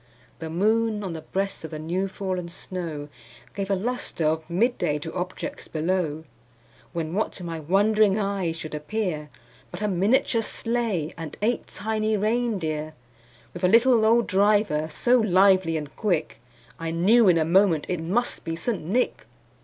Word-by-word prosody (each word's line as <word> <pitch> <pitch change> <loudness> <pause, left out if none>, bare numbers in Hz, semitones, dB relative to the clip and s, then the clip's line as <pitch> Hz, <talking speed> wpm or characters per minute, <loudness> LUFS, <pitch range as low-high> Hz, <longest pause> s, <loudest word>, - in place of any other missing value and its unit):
The 160 -1 -5
moon, 215 +4 +1
on 185 -4 -4
the 160 - -6
breast 195 +4 -3
of 160 - -5
the 155 - -6
new 175 +5 -2
fallen 185 -2 -4
snow, 170 -4 -6 0.5
Gave 195 -1 -4
a 195 - +3
lustre 215 -5 -2
of 160 +1 0
mid 230 +9 +1
day 150 - +1
to 160 +2 -7
objects 185 +11 -5
below; 160 -1 -1 0.7
When, 165 -1 -3
what 215 +3 -1
to 185 - -9
my 165 -2 -4
wondering 200 +5 +3
eyes 195 -5 -1
should 155 -1 -7
appear, 150 -1 -3 0.4
But 175 +4 -6
a - - +2
miniature 215 +5 +2
sleigh, 225 -9 -1
and 160 -3 -7
eight 240 +3 0
tiny 215 +1 -1
rein 225 +2 +1
deer, 155 -2 -3 0.6
With 175 - -8
a - - +6
little 230 +3 +5
old 230 +1 +4
driver, 200 -6 +2
so 245 +10 +3
lively 190 -5 +4
and 150 -2 -7
quick, 180 - -1 0.4
I 165 0 -3
knew 195 +7 +4
in 170 - +5
a 160 - +2
moment 170 -2 +3
it 180 - -2
must 205 +9 -1
be 165 -1 -3
St. 195 +4 -3
Nick. 220 +10 -1
185 Hz, 170 wpm, -25 LUFS, 165-215 Hz, 0.7 s, a